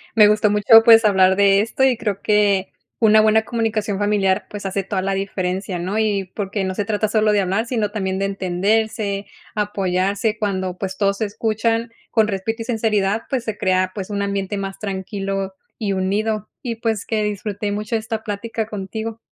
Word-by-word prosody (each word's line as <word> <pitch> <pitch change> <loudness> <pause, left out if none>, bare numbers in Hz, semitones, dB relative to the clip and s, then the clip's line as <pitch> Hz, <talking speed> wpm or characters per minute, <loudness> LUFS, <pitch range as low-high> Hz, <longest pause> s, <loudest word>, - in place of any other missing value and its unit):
Me 215 -2 +8
gustó 210 0 +3
mucho, 210 +2 +7
pues, 225 -1 +7
hablar 190 -2 +4
de 200 0 +4
esto, 230 +4 -1
y 255 -3 +4
creo 205 -4 -3
que 205 -2 +2 0.3
una 215 -1 +6
buena 220 0 +4
comunicación 220 -3 -1
familiar, 205 -1 +1
pues, 205 -1 -7
hace 195 +1 -1
toda 190 0 -2
la 195 0 0
diferencia, 190 -1 -2
¿no? 185 +5 -2
Y 200 -4 0
porque, 200 -1 -2
no 190 0 -2
se 205 - -1
trata 215 +1 0
solo 215 -1 +2
de 205 -1 +3
hablar, 195 +5 -1
sino 220 -5 -1
también 190 -3 -2
de 195 - 0
entenderse, 200 +2 -1 0.3
apoyarse. 200 +1 0
Cuando, 190 -3 -2
pues, 190 -1 -4
todos 200 -1 +1
se 220 - +1
escuchan 225 +2 -1 0.2
con 220 -2 +3
respeto 225 +3 -3
y - - -12
sinceridad, 220 -3 0
pues, 260 -4 -1
se 220 -3 -3
crea, 185 -2 +1
pues, 195 -1 -6
un 200 -1 -2
ambiente 200 0 -2
más 195 -1 -5
tranquilo 195 -1 -3 0.2
y 205 -4 -1
unido. 210 +3 -1
Y, 235 -3 -3
pues, 225 -2 -2
que 220 -2 -1
disfruté 205 0 -3
mucho, 210 +2 -2
esta 220 0 -3
plática 220 +1 -3
contigo. 220 +2 -5
205 Hz, 185 wpm, -20 LUFS, 195-220 Hz, 0.3 s, Me